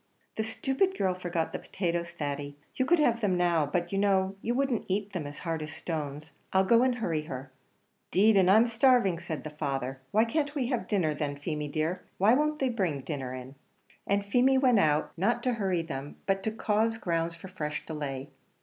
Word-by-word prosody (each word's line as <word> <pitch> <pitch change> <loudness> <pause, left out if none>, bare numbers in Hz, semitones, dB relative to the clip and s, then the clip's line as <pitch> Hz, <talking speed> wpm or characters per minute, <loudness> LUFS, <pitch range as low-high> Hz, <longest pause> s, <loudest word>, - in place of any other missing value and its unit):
"The 220 - -1
stupid 270 - 0
girl 185 -1 +1
forgot 175 -2 -2
the - - -3
potatoes, 170 -2 -2
Thady. 145 -3 -4 0.2
You 260 - 0
could 345 - +5
have 240 -7 +2
them 190 -4 +2
now; 170 -4 +2
but 175 +3 -1
you 195 - 0
know, 195 -1 +2
you 240 - -1
wouldn't 270 -3 0
eat 200 +1 -2
them 165 -6 -3
as 145 - -8
hard 165 -1 -1
as 155 0 -6
stones. 150 -2 -5 0.2
I'll 190 0 +4
go 230 +4 +5
and 255 -1 +3
hurry 165 -10 -2
her." 130 -2 -7 0.6
"'Deed 210 +3 +4
and 185 -2 +5
I'm 220 +4 +7
starving," 235 -6 +3
said 170 -3 -5
the 155 - -6
father. 135 -3 -3
"Why 220 +7 +3
can't 290 +4 -1
we 255 -4 0
have 245 -4 -1
dinner 175 -8 +1
then, 145 -1 -3
Feemy 150 0 -3
dear? 155 +5 -1 0.2
Why 205 +5 +5
won't 300 +3 +2
they 265 -3 +1
bring 185 - -1
dinner 130 -3 -4
in?" 130 +1 -8 0.5
And 200 0 +1
Feemy 250 +6 +4
went 255 -5 +4
out, 155 -3 +2
not 235 +7 +1
to 250 - +1
hurry 190 -6 0
them, 145 -3 -6
but 195 0 +1
to 220 - -1
cause 220 +1 +1
grounds 165 -4 -1
for 170 - -10
fresh 150 -5 -4
delay. 140 -4 -5
185 Hz, 205 wpm, -29 LUFS, 155-225 Hz, 0.6 s, I'm